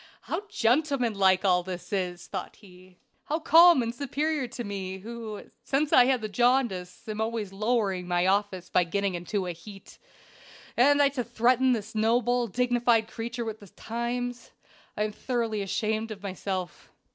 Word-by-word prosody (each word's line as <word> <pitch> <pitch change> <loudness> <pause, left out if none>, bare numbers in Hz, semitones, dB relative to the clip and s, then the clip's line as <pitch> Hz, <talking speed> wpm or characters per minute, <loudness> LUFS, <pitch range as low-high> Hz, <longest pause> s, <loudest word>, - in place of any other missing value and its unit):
"How 415 - -4
gentleman 250 - +1
like 190 -1 +3
all 180 -2 +4
this 180 +2 -7
is!" 180 -3 -2
thought 190 - -6
he. 185 -3 -18 0.3
"How 305 - -1
calm 330 -3 +6
and 230 0 -3
superior 285 +2 -2
to 240 0 -6
me, 190 -2 -5
who, 220 +1 -7 0.2
since 280 +4 0
I 250 - +8
had 255 -2 +2
the 215 - -3
jaundice, 225 -6 0
am 215 0 -3
always 220 -3 -3
lowering 200 -4 0
my 175 0 +1
office 190 -1 0
by 180 - +3
getting 200 +3 -1
into 185 +3 -3
a 180 - -3
heat! 195 +4 -13 0.8
And 285 +4 +5
I 280 - +4
to 265 -3 -3
threaten 250 +2 +2
this 220 -1 -4
noble, 240 +2 +2
dignified 240 0 +1
creature 235 +1 -5
with 220 -1 -5
the 205 - -14
Times. 240 +4 -4 0.5
I 210 - +1
am 215 - -2
thoroughly 230 -2 -2
ashamed 215 +3 -1
of 205 -2 -8
myself. 190 -1 -5
220 Hz, 165 wpm, -27 LUFS, 195-245 Hz, 0.8 s, I